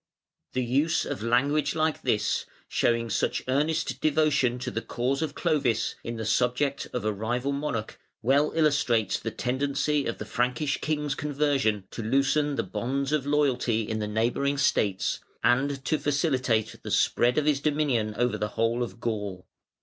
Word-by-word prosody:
The 130 - 0
use 140 +7 +1
of - - -4
language 140 +5 +1
like 155 0 0
this, 105 - 0 0.2
showing 115 -1 +1
such - - 0
earnest 150 +5 0
devotion 145 -5 +2
to 125 - -4
the 115 - -2
cause 130 +5 -1
of 155 -3 -2
Clovis 125 -7 +1
in 115 - -4
the 110 -1 -4
subject 125 +5 +1
of 125 -4 -3
a 110 - +1
rival 120 +6 -2
monarch, 140 -6 -3 0.2
well 140 +5 +3
illustrates 125 - +2
the 115 - -3
tendency 140 +4 0
of 115 - -3
the - - -6
Frankish 125 +4 0
king's 150 -2 -1
conversion 140 -8 0
to - - -5
loosen 140 +5 +1
the - - 0
bonds 135 +9 -2
of 150 -3 0
loyalty 130 -6 +1
in 110 -1 -2
the 105 - -2
neighbouring 120 +6 0
States, 100 -8 +1 0.2
and 135 +2 +2
to 155 - +1
facilitate 130 -7 0
the - - -7
spread 120 +1 +2
of 150 - +2
his 150 -2 +3
dominion 140 -8 0
over 120 0 +1
the 105 - 0
whole 115 +2 +1
of 120 -1 -4
Gaul. 105 -5 -3
130 Hz, 165 wpm, -27 LUFS, 115-145 Hz, 0.2 s, well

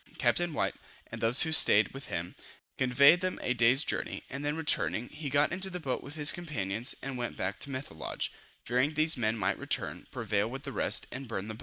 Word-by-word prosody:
Captain 175 -1 +1
White, 150 - -1 0.4
and - - -7
those 115 +2 +6
who 160 - -2
staid 110 -8 +6
with 135 +1 -10
him, 85 +1 -4 0.4
conveyed 140 +7 +5
them 185 0 -2
a 125 - 0
day's 125 +4 +4
journey, - - -3
and 140 +1 -5
then 145 +2 -2
returning, 135 -6 +1
he 150 -1 -6
got 145 +2 +2
into 190 +2 +1
the 180 -1 -6
boat 135 -6 -3
with 145 +2 -10
his 150 -1 +3
companions, 115 - -3
and 135 -1 -5
went 120 - -4
back 95 +4 -3
to - - -5
Methelage, 130 - -5 0.3
fearing 130 +6 0
these 155 +2 +5
men 110 -3 -1
might 100 -1 -1
return, - - -3
prevail - - -1
with - - -7
the - - -7
rest, - - +1
and 135 0 -7
burn 105 -3 -5
the 110 - -5
boat. 110 - -13
135 Hz, 215 wpm, -30 LUFS, 115-150 Hz, 0.4 s, those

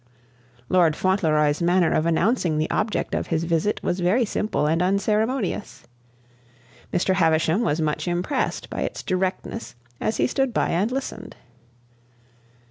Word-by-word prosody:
Lord 170 -2 +3
Fauntleroy's 155 -6 +1
manner 175 0 +3
of 155 - +1
announcing 170 -1 +1
the 155 - -1
object 215 0 -1
of - - -1
his 165 -1 0
visit 170 +4 0
was 175 - -1
very 195 +8 +2
simple 210 -6 -1
and 160 +3 +1
unceremonious. 200 - -1 1.1
Mr. 185 +1 +1
Havisham 165 +1 +2
was 165 -9 0
much 155 +3 -1
impressed 180 +10 -1
by - - -5
its - - -4
directness 185 - -3 0.2
as 220 - -1
he - - +2
stood 270 -3 -1
by - - +1
and 195 +7 0
listened. 270 +1 -5
180 Hz, 135 wpm, -23 LUFS, 160-210 Hz, 1.1 s, Lord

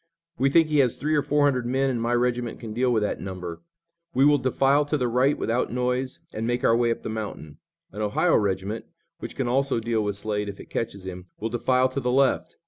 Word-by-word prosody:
"We 135 +2 +3
think 165 +3 +4
he 150 -1 +2
has 125 -4 +3
three 155 +2 -1
or 150 - +3
four 145 +1 +2
hundred 130 -4 +1
men 135 +2 +1
and 120 -2 -2
my 120 +1 0
regiment 120 -1 0
can 110 -2 -7
deal 125 +2 +1
with 110 -3 +2
that 105 - -2
number. 90 -3 -6 0.5
We 135 - +5
will 145 0 +5
defile 135 +3 +3
to 150 +1 0
the 125 -3 0
right 125 +4 +2
without 120 +3 -1
noise 125 +1 -1 0.2
and 110 +1 -3
make 120 0 -1
our 115 - +4
way 120 0 +2
up 115 - -2
the - - -4
mountain. 105 -9 -6 0.3
An 105 - -6
Ohio 105 -1 +2
regiment, 100 +2 -1 0.3
which - - -7
can 130 - -1
also 135 0 +1
deal 115 -1 0
with 105 -1 -2
Slade 105 0 -2
if 100 - -8
it - - -12
catches 100 -4 -3
him, 90 -1 -7
will 115 - -2
defile 125 +2 +2
to 130 - -3
the 125 -2 -1
left. 135 +1 +2
120 Hz, 235 wpm, -25 LUFS, 110-130 Hz, 0.5 s, We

